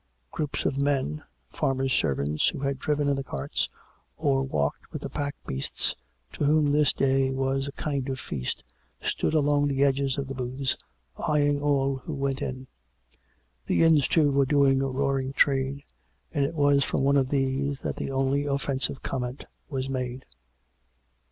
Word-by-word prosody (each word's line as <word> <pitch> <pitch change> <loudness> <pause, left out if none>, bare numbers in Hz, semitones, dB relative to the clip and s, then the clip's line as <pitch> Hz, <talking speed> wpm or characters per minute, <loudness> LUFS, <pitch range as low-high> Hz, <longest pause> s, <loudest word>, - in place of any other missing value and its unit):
Groups 150 -2 -3
of 135 - 0
men 135 - 0 0.2
— - - -43
farmers' 135 -1 0
servants 70 +2 +1
who - - -1
had 140 -1 -1
driven 150 0 0
in 140 - +3
the 135 - -2
carts, 70 - -2 0.5
or 140 -4 +2
walked 75 - -2
with - - -6
the - - -4
pack 145 0 -3
beasts 65 +1 -2 0.2
— 65 +2 -37
to - - -3
whom 150 0 +4
this 150 -1 +4
day 135 0 +2
was 135 +1 0
a - - -4
kind 140 -3 -2
of 130 -1 -3
feast, 65 - -4 0.4
stood - - -1
along 145 -1 +3
the 140 -1 +2
edges 135 -1 +2
of 140 -1 -2
the 135 - -4
booths 130 +1 -2 0.4
eyeing 145 -3 +2
all 140 -2 +2
who 145 +4 -6
went 135 -1 -1
by. 130 0 -4 1.0
The - - +3
inns, 160 -4 +5
too, 150 -4 +3
were 140 -1 +3
doing 140 -2 +4
a 135 - +1
roar 135 +1 +1
ing 135 +1 -4
trade, 135 0 +2 0.5
and 140 - +2
it 160 +4 -4
was 145 -2 +4
from 135 - -1
one 140 +1 +4
of 135 -2 +3
these 135 0 0
that - - -3
the - - -3
only 135 +2 +1
offensive 140 -1 -1
comment 125 0 -3 0.2
was 135 -3 -2
made. 130 -1 -3
135 Hz, 175 wpm, -27 LUFS, 130-145 Hz, 1.0 s, inns